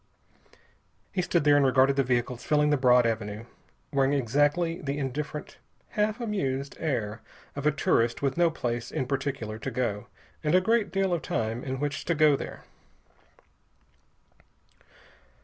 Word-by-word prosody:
He 185 - 0
stood 170 -2 +1
there 145 0 +5
and 145 - +4
regarded 135 +1 +4
the 135 - +3
vehicles 125 -1 -1
filling 150 0 +2
the - - +4
broad 125 -2 +4
avenue, 110 -1 -2 0.5
wearing 135 0 +2
exactly 145 +6 +1
the 140 0 -3
indifferent, 145 +2 -5 0.3
half 210 +2 0
amused 140 - -2
air 115 -8 -2 0.3
of 140 +1 -1
a - - +5
tourist 115 -5 +1
with 140 -1 0
no 175 -1 +4
place 120 -6 -3
in 130 - -2
particular 135 -5 -3
to 135 - -4
go 115 -5 -2 0.4
and 155 +3 +2
a - - +7
great 215 0 +1
deal 195 -1 +1
of 170 - -1
time 115 +2 -2
in 130 -1 -4
which 145 -1 -2
to 170 - +1
go 155 -1 +5
there. - - -7
140 Hz, 150 wpm, -27 LUFS, 125-155 Hz, 0.5 s, a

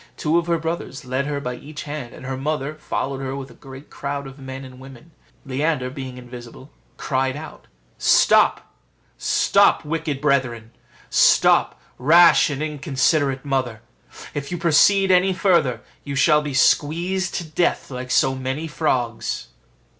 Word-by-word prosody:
Two 160 +2 +1
of 170 - -5
her 170 -1 +1
brothers 160 -5 -5
led 130 +2 -2
her 145 -1 -2
by 125 -3 -4
each 145 +4 -9
hand, 145 -5 -6
and - - -11
her 135 0 -3
mother 145 +1 -3
followed 140 -3 -4
her 135 0 -4
with 135 -2 -7
a - - -14
great 135 +3 -13
crowd 140 0 -5
of 135 +1 -11
men 135 0 -8
and 130 -1 -13
women. 135 +4 -14 0.3
Leander, 135 -1 -1
being 130 -2 -7
invisible, 125 +2 -11 0.3
cried 130 -1 -1
out, 155 +2 -10 0.3
"Stop, - - +3 0.5
stop, - - +3
wicked 155 -2 -3
brethren: 130 -6 0 0.4
stop, - - +4 0.2
rash 165 +7 +6
and 145 +1 -3
inconsiderate 140 -2 0
mother; 130 -5 -2 0.5
if 140 +1 -5
you 175 - -2
proceed 190 +4 +4
any 185 +1 +4
further, 170 - +1 0.2
you 140 -1 -5
shall 150 +2 +4
be 145 -3 -5
squeezed 175 +8 +1
to - - -2
death 160 -1 -1
like 125 0 -6
so 130 +1 +3
many 130 +4 -4
frogs." 130 -7 -2
140 Hz, 155 wpm, -21 LUFS, 130-155 Hz, 0.5 s, rash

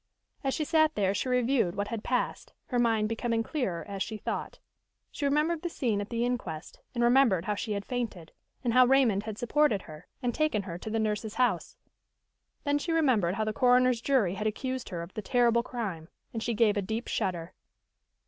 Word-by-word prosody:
As 270 -1 0
she 310 - -1
sat 315 -1 +3
there 195 -1 +2
she 205 +6 -2
reviewed 250 -7 +2
what 205 0 -2
had 230 -2 -4
passed, 250 -1 -2 0.2
her 245 - +1
mind 225 -3 +2
becoming 225 +1 -1
clearer 215 - -2
as 200 -1 -5
she 215 +2 -2
thought. - - -4 0.5
She 285 - -3
remembered 305 +3 +1
the 345 - -2
scene 230 -10 -1
at 205 - -6
the 235 0 0
inquest, 180 -11 -4 0.2
and 240 - +1
remembered 240 -8 +4
how 210 - 0
she 210 +1 -3
had 200 -1 -3
fainted, 220 -10 -4 0.3
and 235 -2 +1
how 255 0 +7
Raymond 240 -7 +3
had 215 -2 -5
supported 245 -3 +2
her 155 0 -12 0.2
and 245 -1 0
taken 305 -9 +1
her 175 -3 -6
to 220 - -6
the 225 - -1
nurse's 215 0 -1
house. 250 -1 0 0.9
Then 290 0 +1
she 335 - -3
remembered 250 - +2
how 220 - 0
the 215 0 -1
coroner's 250 -1 +4
jury 240 -9 +2
had 210 +2 -2
accused 260 +3 -3
her 170 -3 -4
of 170 - -11
the 215 - -4
terrible 235 +2 +3
crime, 200 -10 -5 0.2
and 225 - -3
she 235 0 -1
gave 215 -1 +3
a - - +2
deep 220 +5 -3
shudder. 180 -4 -2
230 Hz, 205 wpm, -29 LUFS, 205-255 Hz, 0.9 s, how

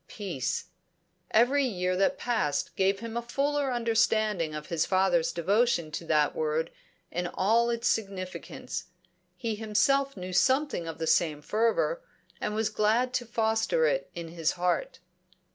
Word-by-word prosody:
Peace! 185 - -4 0.6
Every 255 +6 +4
year 185 -7 0
that 195 +9 +2
passed 220 -12 -1
gave 195 +1 +1
him 230 0 -6
a 235 - 0
fuller 275 +3 0
understanding 220 -8 +1
of 150 0 -6
his 170 -3 +1
father's 220 +7 +2
devotion 185 -1 +1
to 165 - -5
that 150 -2 +2
word 155 +1 -1 0.4
in 175 0 -2
all 225 +7 +2
its 235 0 -1
significance; 195 -4 -3 0.5
he 230 -3 -2
himself 225 +5 +1
knew 185 0 -6
something 265 - +2
of 165 - -5
the 165 - -2
same 160 -2 +2
fervour, 230 - +1 0.4
and 210 - -2
was 220 0 +1
glad 220 +4 +1
to 245 -2 -1
foster 225 - +1
it - - 0
in 170 -1 -6
his 165 -1 -1
heart. 175 -2 -1
215 Hz, 145 wpm, -28 LUFS, 175-240 Hz, 0.6 s, Every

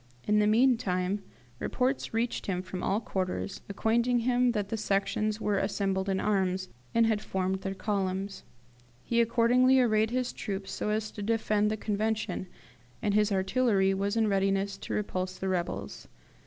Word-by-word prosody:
In 210 0 +4
the 210 - +3
meantime 210 -5 +2 0.4
reports 260 +2 -1
reached 230 +2 -1
him 180 -2 -1
from 185 -1 -6
all 200 +2 +1
quarters 190 -2 -3
acquainting 235 +4 +1
him 245 0 +2
that 205 -3 -2
the 225 - -1
Sections 210 +1 0
were 205 -3 +1
assembled 195 -1 -1
in 190 -1 +1
arms, 190 -2 0 0.3
and 230 0 +5
had 220 -2 +1
formed 190 0 -2
their 195 0 -3
columns. 195 -1 -2 0.6
He 235 0 +2
accordingly 245 +3 +4
arrayed 220 -3 +3
his 250 +1 -1
troops 195 -2 -5
so - - -2
as 215 0 -1
to 210 - -8
defend 210 -1 +1
the 215 - -1
Convention, 215 -2 -2 0.5
and 205 - 0
his 210 0 +3
artillery 195 0 +2
was 200 +3 -1
in 220 -1 +3
readiness 195 0 +1
to - - -5
repulse 185 -3 -2
the 190 - -2
rebels. 180 -2 -3
205 Hz, 160 wpm, -29 LUFS, 195-225 Hz, 0.6 s, and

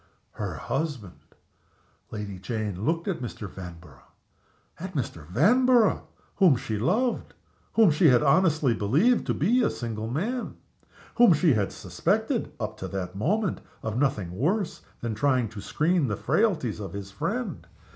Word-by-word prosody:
Her - - -5
husband! 135 - -5 0.7
Lady 105 -3 -6
Jane 105 -2 -3
looked 165 +4 0
at 190 -9 -2
Mr. 115 -4 -6
Vanborough 85 -7 -11 0.8
at 185 +1 -7
Mr. 85 - -4
Vanborough, 230 - +3 0.3
whom 185 -8 +6
she 110 -3 -3
loved; 235 - 0 0.4
whom 220 -6 +6
she 155 +3 +4
had 125 0 +5
honestly 150 -3 +3
believed 150 - +2
to - - +1
be 235 +10 +2
a - - +3
single 110 -2 -4
man; 220 - -2 0.6
whom 240 -6 +7
she 155 -1 +3
had 105 -4 0
suspected, - - -1
up - - -4
to - - -5
that 95 -1 -5
moment, 190 - 0 0.2
of 110 -1 -3
nothing 120 -9 0
worse 165 - -1 0.2
than 115 - -2
of 105 - -6
trying 130 -4 +2
to 105 -1 -8
screen 155 - +1
the 105 -3 -2
frailties 155 - +1
of 100 -5 -6
his 100 0 -7
friend. 200 - -3
135 Hz, 150 wpm, -26 LUFS, -, 0.8 s, whom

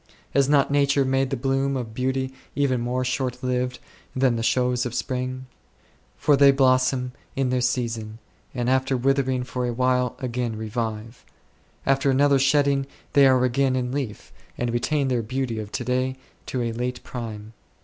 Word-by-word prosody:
Has 140 0 +3
not 140 -1 +3
Nature 140 -1 +3
made 135 0 +1
the 135 - -2
bloom 135 +1 0
of 115 -3 -5
beauty 130 +2 -1 0.2
even 130 -3 +1
more 125 +2 -1
shortlived 125 0 -1 0.4
than 130 -2 +2
the 115 - -2
shows 125 +1 +1
of 120 -2 -4
spring? 130 0 -3 0.7
For 145 - +4
they 140 0 +7
blossom 130 -1 +3 0.2
in 135 -2 0
their 125 0 +1
season, 115 -3 -2 0.3
and 120 -2 -3
after 130 0 +2
withering 130 0 +1
for 125 0 -3
a 120 - -2
while 125 0 +1
again 120 -2 -3
revive; 110 +1 -4 0.6
after 135 0 +2
another 140 +1 +4
shedding 140 0 +2 0.3
they 140 -1 +7
are 130 -1 +4
again, 130 +1 +1
in 125 -1 -1
leaf, 130 -6 -5 0.2
and 120 -1 -1
retain 140 +4 0
their 125 -3 +1
beauty 120 0 -3
of 105 -1 -6
to - - -2
day 130 +1 0 0.3
to 125 -2 -2
a 115 - -1
late 125 +2 -3
prime. 110 -3 -7
130 Hz, 165 wpm, -24 LUFS, 120-135 Hz, 0.7 s, they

